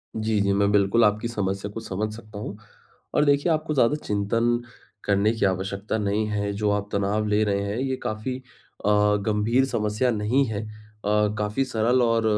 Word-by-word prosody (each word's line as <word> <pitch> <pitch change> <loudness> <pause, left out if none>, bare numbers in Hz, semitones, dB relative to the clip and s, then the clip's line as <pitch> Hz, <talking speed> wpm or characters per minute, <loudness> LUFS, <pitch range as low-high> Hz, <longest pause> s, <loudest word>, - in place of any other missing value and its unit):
जी, 110 -1 0
जी। 100 0 +2
मैं 100 +1 +2
बिल्कुल 105 +3 +3
आपकी 105 +2 +1
समस्या 100 -3 -2
को 115 - -6
समझ 105 0 -3
सकता 110 -2 -11
हूँ। 105 -1 -6 0.6
और 150 - +3
देखिए 145 +4 +3
आपको 155 0 0
ज़्यादा 135 +1 +3
चिंतन 115 +4 +1 0.4
करने 100 +2 +2
की 110 -3 0
आवश्यकता 95 +3 -1
नहीं 105 +1 0
है। 100 -1 -1
जो 105 +1 0
आप 105 0 -1
तनाव 100 +2 0
ले 105 +1 +2
रहे 100 -1 0
हैं, 100 +3 -3
ये 130 0 -1
काफ़ी 110 +4 -3 0.5
अ, - - +3 0.4
गंभीर 110 +5 +2
समस्या 105 0 0
नहीं 110 +6 +2
है। 110 -2 -3
अ, 110 - -10 0.7
काफ़ी 105 +5 0
सरल 125 +1 +2
और 115 -1 +2
105 Hz, 180 wpm, -25 LUFS, 100-115 Hz, 0.7 s, बिल्कुल